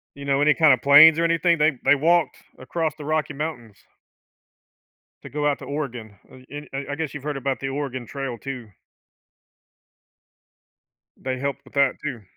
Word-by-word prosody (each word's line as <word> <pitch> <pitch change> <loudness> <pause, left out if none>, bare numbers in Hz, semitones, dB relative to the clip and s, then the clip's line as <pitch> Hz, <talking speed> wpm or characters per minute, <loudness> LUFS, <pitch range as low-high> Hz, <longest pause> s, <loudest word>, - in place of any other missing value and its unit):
you 140 0 -9
know, 140 0 +1
any 150 0 +5
kind 155 -4 +5
of 125 - -1
planes 150 +4 +8
or 170 - +1
anything. 170 0 +2
They 150 -3 +2
they 145 - +5
walked 165 +1 +1 0.2
across 155 +3 -3
the 150 - -9
Rocky 155 -1 -1
Mountains. 125 -8 -7 1.4
To - - -10
go 150 0 -1
out 145 - 0
to - - -9
Oregon. 125 -8 -6
Uh - - -15
and 145 +1 -8
I 135 +1 -4
I - - -3
guess 160 -2 -4
you've 145 -2 -8
heard 145 -2 -3
about 135 0 -2
the 135 - -4
Oregon 135 -3 -4
Trail 135 -3 -5
too. 125 -5 -8 2.5
They 130 -1 -4
helped 140 0 -4
with - - -18
that 140 -2 +2
too. 130 -8 -5
140 Hz, 180 wpm, -23 LUFS, 135-150 Hz, 2.5 s, planes